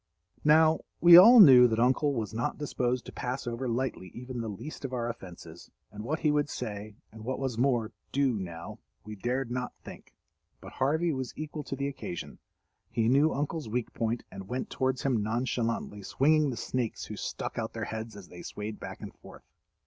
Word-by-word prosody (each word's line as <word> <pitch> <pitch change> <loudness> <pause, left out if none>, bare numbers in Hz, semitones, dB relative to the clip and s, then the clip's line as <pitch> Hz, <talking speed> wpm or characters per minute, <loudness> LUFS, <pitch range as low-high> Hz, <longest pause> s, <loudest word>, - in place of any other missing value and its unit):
Now, 155 +1 +5 0.2
we 170 0 +9
all 230 +8 +10
knew 130 - +10
that 115 -1 -1
Uncle 130 +4 +3
was 110 -2 -3
not 120 +6 -2
disposed 125 -4 -2
to - - -8
pass 125 +2 -4
over 120 +2 -3
lightly 120 -5 -2
even 125 0 -6
the 115 - -4
least 125 +12 -8
of 135 -1 -5
our 120 -2 -1
offenses, 85 -7 -9 0.2
and 105 +1 -8
what 155 +7 -2
he 150 - +3
would 145 0 +1
say, 105 -4 -6 0.2
and 110 0 -11
what 130 +3 -3
was 135 -3 -2
more, 120 -4 +1 0.2
do 135 -2 +2
now, 85 -2 -7 0.2
we 105 0 -8
dared 120 +4 -2
not 125 0 -3
think. - - -12 0.4
But - - -11
Harvey 160 +5 +1
was 130 -2 -5
equal 155 0 -5
to - - -4
the 140 +1 -2
occasion. 85 - -7 0.5
He 115 0 +1
knew 145 +5 +4
Uncle's 145 -2 -3
weak 120 +1 -3
point, 115 +1 -2
and 95 0 -9
went 125 +3 -4
towards 130 -1 -1
him 125 -6 +1
nonchalantly 115 -1 -2
swinging 150 +8 +2
the 120 - -4
snakes 125 -3 -3
who - - -7
stuck - - -4
out - - -4
their - - -4
heads 110 0 -6
as 100 -3 -11
they 85 - -10
swayed 105 +3 -6
back - - -8
and - - -8
forth. - - -15
125 Hz, 195 wpm, -29 LUFS, 110-140 Hz, 0.5 s, all